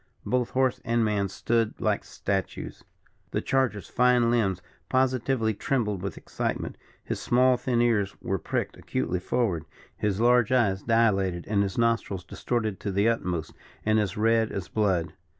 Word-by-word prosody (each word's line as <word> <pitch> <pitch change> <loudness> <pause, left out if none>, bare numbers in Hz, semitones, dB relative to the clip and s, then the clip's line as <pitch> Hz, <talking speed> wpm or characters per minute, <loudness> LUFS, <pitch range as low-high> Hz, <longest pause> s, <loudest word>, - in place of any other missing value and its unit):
Both 125 -1 0
horse 130 -1 +1
and 115 0 +1
man 100 -2 0
stood 115 +3 0
like - - 0
statues. 95 -2 -4 0.5
The - - -1
charger's 130 -7 0
fine 125 -1 +3
limbs 100 -7 +1 0.3
positively 130 -3 +1
trembled 105 -4 -1
with 95 -2 -4
excitement; - - -3 0.3
his - - -3
small, 125 +1 +4
thin 120 -1 +1
ears 105 -5 +1
were 95 -1 -2
pricked - - -3
acutely 90 - -2
forward; 95 -5 0 0.3
his 105 -1 -1
large 120 -1 +4
eyes 105 -7 +2
dilated; 100 -6 +2
and 100 -1 +2
his 100 -1 -2
nostrils 115 -5 0
distorted 110 +1 -2
to 100 - -3
the 100 +3 +2
utmost, 90 -8 -1 0.3
and 110 0 +3
as 100 -3 -1
red 115 +1 +2
as 95 -4 -5
blood. 95 -7 0
110 Hz, 150 wpm, -27 LUFS, 95-120 Hz, 0.5 s, small